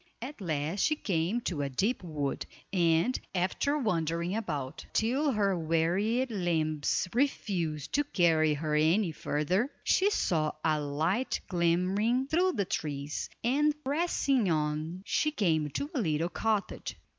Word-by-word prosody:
At 255 0 -7
last 160 +1 -2
she 310 - +3
came 195 - -1
to 170 -9 -2
a 140 - -1
deep 200 - 0
wood, 150 -5 -3 0.3
and, 170 +6 +2 0.2
after 190 +11 +1
wandering 170 - 0
about 150 -12 -4
till 265 +6 +2
her 200 -3 +2
wearied 180 +10 +1
limbs 160 -5 0
refused 180 - -1
to 290 - +3
carry 160 - +3
her 155 +1 -2
any 165 +5 +3
further, 170 - 0
she 390 +2 +3
saw 155 - +1
a 155 -1 +2
light 160 - 0
glimmering 185 +8 +2
through 355 +6 +2
the 200 -4 0
trees, 145 -3 -3
and 290 +5 +2
pressing 275 - +1
on 155 +3 -1
she 305 - +1
came 160 - +1
to 280 - -4
a 270 - 0
little 165 -2 0
cottage. 215 +3 -2
180 Hz, 135 wpm, -30 LUFS, 155-235 Hz, 0.3 s, she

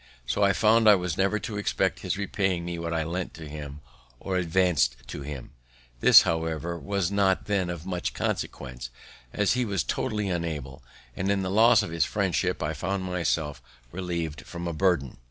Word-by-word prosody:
So 60 +10 -1
I 100 -1 +5
found 110 +2 +4
I 105 - +9
was 90 -4 -2
never 95 +2 +1
to 105 0 -5
expect 105 - 0
his - - -2
repaying 95 -3 -1
me 85 -1 -4
what 85 0 -3
I 80 -1 0
lent 85 +3 -4
to 80 -1 -9
him 75 -1 -8 0.4
or 95 - -3
advanc'd 85 -7 +2
for 70 +3 -6
him. 70 -3 -7 0.5
This, - - +9
however, 80 +1 -2
was 100 -2 -1
not 100 -2 +2
then 100 -4 0
of 85 -1 -5
much 90 -2 -3
consequence, 65 -2 -3 0.4
as 105 -1 +2
he 125 0 +1
was 100 -4 -1
totally 105 -5 -2
unable; 80 -6 -3 0.3
and 95 +1 -2
in 100 -1 +1
the 95 - -2
loss 110 +1 +6
of 95 - -5
his 85 0 +2
friendship 95 -4 0
I 75 +1 -1
found 95 +6 -2
myself 80 -6 -1 0.3
relieved 85 -4 -3
from 85 0 -7
a 85 - -2
burthen. 80 -7 +1
90 Hz, 185 wpm, -27 LUFS, 80-100 Hz, 0.5 s, I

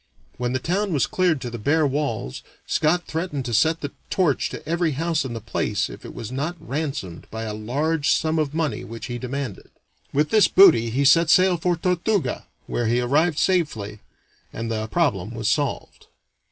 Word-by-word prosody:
When 125 0 -2
the - - +2
town 185 +7 -1
was 140 - +2
cleared 180 -5 +1
to 120 - -5
the 120 - -6
bare 150 +7 +2
walls 130 - -2 0.2
Scot 175 +3 +1
threatened 160 -5 -3
to 120 - -3
set 160 +9 +2
the 145 - -4 0.2
torch 170 -8 +1
to - - -9
every 170 -1 +1
house 165 +2 0
in 125 - -4
the 115 - -4
place 115 - -2
if - - -11
it - - -9
was 115 0 -6
not 150 +7 -2
ransomed 140 - -4
by 110 0 -5
a 110 -1 -4
large 145 +8 -1
sum 160 0 +1
of 150 -3 0
money 155 -8 -2
which 115 +1 -8
he 120 0 -5
demanded. 130 -4 -5 0.4
With 150 +2 +1
this 215 -2 +6
booty 120 -12 +6
he 135 +5 0
set 165 +4 +5
sail 185 +1 +5
for 175 +1 0
Tortuga, 180 - -1 0.2
where 120 - -1
he 120 +2 +2
arrived 145 +6 +2
safely 120 - 0 0.5
and 115 0 -4
the 110 -1 -2
problem 115 - 0
was 110 -2 -2
solved. 140 +5 -2
145 Hz, 190 wpm, -23 LUFS, 120-165 Hz, 0.5 s, this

